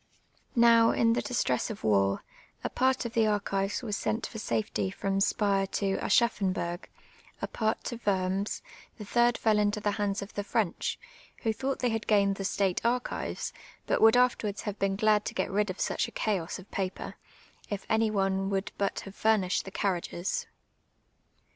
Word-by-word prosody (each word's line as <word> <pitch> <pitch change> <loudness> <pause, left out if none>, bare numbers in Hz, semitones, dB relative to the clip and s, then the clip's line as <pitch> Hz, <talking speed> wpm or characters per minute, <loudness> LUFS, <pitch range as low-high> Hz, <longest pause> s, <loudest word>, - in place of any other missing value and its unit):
Now, 230 -1 +6
in 230 0 +3
the - - +1
distress 130 - 0
of 220 - -7
war, 100 -2 +2 0.4
a - - -2
part 260 -1 +1
of 235 - -4
the 225 -1 +3
archives 200 +1 -1
was 210 -4 -2
sent 220 +2 -1
for 220 - -7
safety 110 - -1
fi'om 195 - -1
Spire 195 -1 +2
to 195 -1 0
Aschaffonburg, 185 -7 +1 0.5
a - - -3
pai't 220 -1 -1
to 240 - -5
Worms, 195 0 0 0.3
the 215 - -7
tliii 240 +3 +3
d - - -5
fell 215 -2 +3
into 210 0 +1
the 205 0 0
hands 200 -1 0
of 200 - -11
the 205 - -2
PVench, 205 -3 -1 0.5
who 225 -2 +1
thonght 265 +4 -2
they 245 - +2
had 225 -1 -2
gained 200 -2 +3
the 195 - -4
state 190 -2 0
archives, 245 +1 -2 0.3
but - - +1
would 225 +2 +7
afterwards 235 -5 +1
have 205 -2 -4
been 195 0 +1
glad 210 0 +3
to - - -4
get - - -1
rid 205 +1 +1
of 185 - -5
such - - 0
a - - -10
chaos 190 -6 -1
of 190 - -14
paper, 190 -1 -3 0.6
if 205 -2 -4
any 220 0 +2
one 195 -1 0
would 195 0 -1
but 200 -1 0
have 195 - -10
fiu 220 0 +4
nished 180 - -1
the - - -6
carriages. 190 - -2
205 Hz, 185 wpm, -29 LUFS, 195-225 Hz, 0.6 s, would